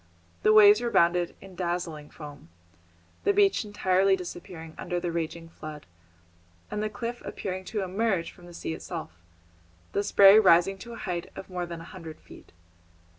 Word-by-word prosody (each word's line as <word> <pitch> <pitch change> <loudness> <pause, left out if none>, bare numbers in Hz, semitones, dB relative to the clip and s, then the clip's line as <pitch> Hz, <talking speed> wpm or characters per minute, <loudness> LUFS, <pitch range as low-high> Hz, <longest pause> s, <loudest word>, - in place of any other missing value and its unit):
The - - +4
waves 210 0 +8
rebounded 175 -7 +2
in 195 -1 -12
dazzling 175 -4 -4
foam, 145 - -11 0.7
the 405 - +3
beach 400 -7 +3
entirely 195 -2 +2
disappearing 175 -3 -8
under 175 0 -3
the 175 -1 -3
raging 165 0 -4
flood, 155 -2 -9 0.9
and 210 - -2
the 215 - -1
cliff 230 +3 -5
appearing 185 -1 -5
to 210 -1 -3
emerge 190 -2 -1
from 175 -2 -16
the 175 - -12
sea 160 - -4
itself, 165 - -6 0.8
the 200 - 0
spray 200 0 +7
rising 190 0 +4
to 235 +4 -9
a - - -8
height 175 -3 -3
of 190 - -9
more 180 -1 -3
than 170 -1 -7
a 165 - -12
hundred 165 -4 -9
feet. - - -16
180 Hz, 165 wpm, -27 LUFS, 170-205 Hz, 0.9 s, waves